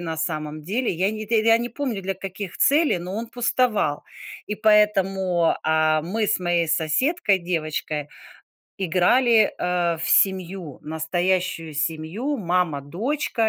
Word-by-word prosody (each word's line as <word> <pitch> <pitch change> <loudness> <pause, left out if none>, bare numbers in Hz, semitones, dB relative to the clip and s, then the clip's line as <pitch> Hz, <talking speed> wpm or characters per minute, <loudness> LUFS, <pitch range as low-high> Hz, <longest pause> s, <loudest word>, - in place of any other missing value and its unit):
на 165 -2 -4
самом 155 -1 -4
деле. 220 +9 -1
Я 185 +4 +1
не 215 0 -6
тэ 220 0 +2
я 225 0 +5
не 240 +1 -3
помню 250 -9 -3
для 195 +1 -2
каких 190 0 -7
целей, 290 - +3
но 180 +3 -6
он 230 +2 -4
пустовал. 235 - 0 0.4
И 210 - -3
поэтому, 195 -5 +2
а, 155 0 +2
мы 210 +7 -1
с - - +1
моей 175 -2 0
соседкой, 195 - +1
девочкой, 155 -4 -3 0.7
играли, 215 +6 +3
а, 175 -1 0
в 165 - -4
семью. 185 -5 +1
Настоящую 165 +1 -1
семью- 165 - -2
мама, 180 - 0
дочка.. 225 - -1
185 Hz, 140 wpm, -23 LUFS, 160-215 Hz, 0.7 s, я